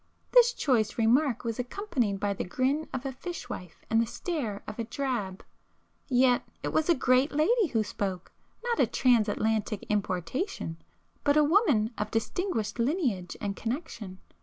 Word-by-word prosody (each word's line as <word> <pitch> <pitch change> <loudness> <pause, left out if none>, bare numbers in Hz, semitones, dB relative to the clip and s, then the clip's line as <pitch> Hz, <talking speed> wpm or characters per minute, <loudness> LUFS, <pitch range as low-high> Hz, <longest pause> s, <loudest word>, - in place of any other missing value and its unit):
This - - +6
choice 230 - +1
remark 245 +3 +3
was 230 -1 -3
accompanied 250 - -1
by 200 0 0
the - - -3
grin 265 +10 0
of 260 +1 -4
a 270 - -1
fishwife 265 - -7
and 225 0 +3
the 230 - 0
stare 235 - -3
of 215 +2 -8
a - - 0
drab. 235 -6 -3 0.6
Yet 250 -1 +4 0.2
it - - -1
was 315 +2 +1
a 340 - +6
'great' 255 +3 +3
lady 400 +8 +3
who 225 -6 +1
spoke,—not 205 - -5
a - - +5
Transatlantic 220 -3 +1
importation, 195 - -2 0.5
but 285 +1 +3
a 300 - +6
woman 290 - +3
of 210 - -1
distinguished 225 - -2
lineage 235 - 0
and 200 -1 -3
connection. 230 - -5
245 Hz, 150 wpm, -29 LUFS, 210-300 Hz, 0.6 s, This